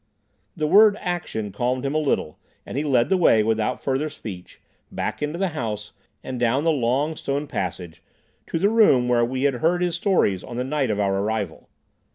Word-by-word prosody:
The 155 - -1
word 210 +5 +6
"action" 170 - -3
calmed 125 +4 -1
him 135 - -1
a 155 - +2
little, 140 - -1 0.3
and - - -8
he 145 - 0
led 130 -5 +2
the 190 - +3
way, 115 -11 +4
without 110 +3 0
further 140 +3 -1
speech, 95 -11 -10 0.3
back - - -4
into 150 +3 -2
the 190 0 0
house, 110 -8 -5 0.3
and 130 -2 -5
down 125 +4 +1
the 165 - +3
long 140 +3 0
stone 140 0 -3
passage 90 - -5 0.5
to - - -2
the 195 +5 +2
room 210 - +4
where 120 -1 +3
we 130 +2 -2
had 140 -1 +3
heard 175 +6 +1
his 175 -2 0
stories 170 - +1
on 120 - -8
the 125 - -1
night 135 0 -1
of 105 -1 -1
our 95 -1 +1
arrival. 105 -4 -3
130 Hz, 200 wpm, -23 LUFS, 110-155 Hz, 0.5 s, word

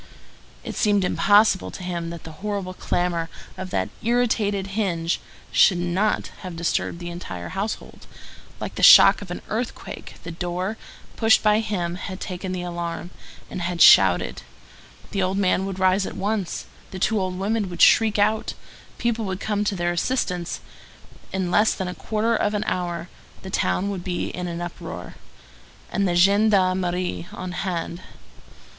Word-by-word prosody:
It - - -6
seemed 205 -3 +2
impossible 205 +1 +4
to 185 - -8
him 170 -2 -3
that 170 -1 -8
the 160 - -9
horrible 200 -3 -3
clamor 175 -2 -1 0.3
of 185 0 -6
that 95 - -1
irritated 220 -4 +1
hinge 175 -6 -1 0.3
should 185 - +5
not 180 +4 0
have 185 -3 -7
disturbed 170 0 -1
the 175 0 -6
entire 90 - -7
household, 200 +4 -5 0.5
like - - -5
the - - -5
shock - - +9
of 200 - -9
an 175 - -6
earthquake; 225 +3 -5
the 170 - -6
door, 180 +4 -3 0.4
pushed 225 -1 +4
by 210 0 +4
him, 180 -6 -2
had 185 0 -6
taken 185 -1 -5
the 180 -1 -3
alarm, 175 0 -4 0.4
and 185 - -6
had 175 0 -2
shouted; 95 - +6 0.7
the 195 - -1
old 185 +1 0
man 190 -1 +2
would 195 -1 -5
rise 190 +1 +2
at - - -7
once; 205 -2 -2 0.2
the 190 - -7
two 210 +2 +1
old 185 -1 -2
women 205 +1 -1
would 175 -1 +2
shriek 220 -2 +5
out; 215 +1 +1 0.4
people 235 -1 -1
would 190 -1 -3
come 210 -1 -1
to 205 -1 -1
their 175 -1 0
assistance; 175 -2 -1 0.7
in 190 -2 -2
less 210 +3 +4
than 190 - -3
a 180 - -4
quarter 220 +4 0
of 210 -1 0
an 210 - 0
hour 175 -1 -2 0.4
the 190 - -7
town 200 +2 0
would 185 -3 -5
be 175 -1 -2
in 180 0 -5
an 170 0 -4
uproar, 175 - -7 0.8
and 200 0 +1
the 175 - 0
gendarmerie 185 - +2
on 185 0 -6
hand. 175 -1 -3
185 Hz, 165 wpm, -23 LUFS, 175-205 Hz, 0.8 s, shock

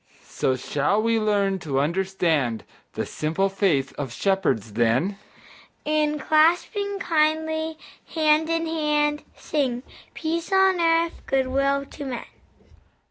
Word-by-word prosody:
So 130 - -1
shall 145 - 0
we 225 +1 +2
learn 200 -3 +1
to 140 -6 -1
understand 165 -7 0 0.3
The - - -3
simple 165 +6 -1
faith 175 -9 +1
of 135 -4 -3
shepherds 160 - 0
then, 125 - +1 0.7
And, 300 0 +1
clasping 350 +7 +2
kindly, 315 -2 0 0.4
hand 310 0 +3
in 330 0 0
hand, 300 -2 0
Sing, 260 -5 -2 0.3
"Peace 335 +2 -3
on 385 -2 +4
earth, 330 0 +2
good 265 -1 +1
will 275 +1 +1
to 285 +1 -9
men." 250 -3 -5
270 Hz, 120 wpm, -24 LUFS, 190-315 Hz, 0.7 s, on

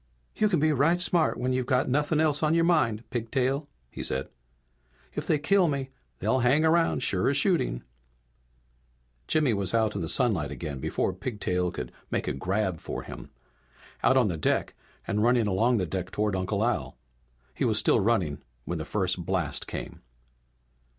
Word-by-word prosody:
"You 215 - +2
can 175 -6 +2
be 155 +1 +3
right 155 +6 +3
smart 175 -2 +1
when 130 +1 -1
you've 130 -1 -1
got 130 -2 +2
nothing 150 +3 +1
else 155 -2 +2
on 155 +1 +2
your 165 - +3
mind, 135 -11 +2
Pigtail," 130 +4 -1 0.2
he - - -7
said. 65 +1 -3 0.8
"If - - -4
they 155 - +3
kill 180 +5 +3
me 135 -3 -2 0.3
they'll 130 - +1
hang 130 +5 +3 0.4
sure 95 +4 +1
as 140 - +1
shooting!" 140 - +1 1.4
Jimmy 150 -6 +2
was 100 0 -1
out 110 -2 +2
in - - -3
the 80 - -3
sunlight 100 - +2
again 70 0 -5
before 95 - -1
Pigtail 90 -4 -2
could 60 - -6 0.2
make - - -2
a - - 0
grab 95 +4 -1
for - - -5
him. - - -9 0.7
Out 130 - +4
on 125 -4 +4
the 85 -4 -2
deck 75 - 0 0.3
and 105 - -1
running 120 0 +3
along 115 +5 +2
the 95 - 0
deck 90 +1 -4
toward 105 0 -1
Uncle 100 +3 0
Al. 80 - -2 0.6
He - - -3
was - - +2
still - - +4
running 95 -9 +1 0.3
when 85 -1 -3
the 80 - -4
first 95 0 -1
blast 85 -5 -2
came. - - -7
115 Hz, 175 wpm, -27 LUFS, 95-140 Hz, 1.4 s, Out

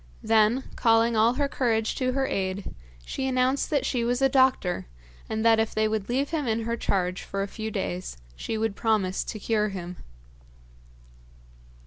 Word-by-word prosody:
Then, 220 +3 +3
calling 230 0 +3
all 225 +2 +4
her 285 +1 +1
courage 225 -5 0
to 255 -1 0
her 270 0 +1
aid, 190 -3 -3 0.3
she 265 - -3
announced 260 +1 +1
that 290 -3 +1
she 245 -3 0
was 245 +1 0
a 270 0 +4
doctor, 260 - +2 0.4
and 220 +1 -2
that 225 -1 +5
if 220 0 -1
they 215 0 +2
would 215 -1 -2
leave 270 +5 0
him 305 -5 -1
in 225 0 0
her 230 +1 -1
charge 185 -4 -1
for 195 0 -3
a - - -3
few 220 +2 -5
days 185 - -4 0.2
she 220 - -4
would 220 -2 -1
promise 205 -5 0
to 220 - -5
cure 215 0 0
him. 180 -2 -6
225 Hz, 175 wpm, -26 LUFS, 205-255 Hz, 0.4 s, that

